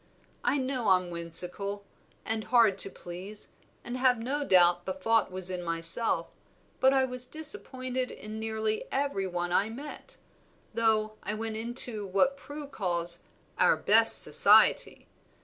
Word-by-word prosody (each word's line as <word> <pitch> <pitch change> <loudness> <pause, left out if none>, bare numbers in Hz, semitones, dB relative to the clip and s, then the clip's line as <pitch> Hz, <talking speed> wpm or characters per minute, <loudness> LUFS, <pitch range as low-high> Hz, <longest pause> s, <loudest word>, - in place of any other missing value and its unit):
I - - 0
know 260 -3 -3
I'm 185 -2 +1
whimsical, 180 +4 -3 0.4
and 220 -1 -3
hard 225 -6 +2
to - - +4
please, 190 +4 -11 0.3
and 240 - -7
have 255 -1 +2
no 270 +6 -4
doubt 175 -6 +3
the 190 - -3
fault 225 +3 0
was 185 0 -6
in 180 -1 -4
myself, 165 +6 +3 0.5
but 265 - +4
I 270 -1 +2
was 250 -1 +3
disappointed 260 -6 -4
in 215 +1 -9
nearly 220 -1 -3
every 270 -9 -2
one 175 -1 -4
I 200 +4 0
met, 295 - -11 0.6
though 215 -1 -1
I 210 - -5
went 220 0 -5
into 225 -2 +1
what 200 +9 +1
Prue 290 +1 -10
calls 175 -9 -1 0.4
'our - - +3
best - - +6
society.' - - +3
220 Hz, 145 wpm, -27 LUFS, 185-255 Hz, 0.6 s, best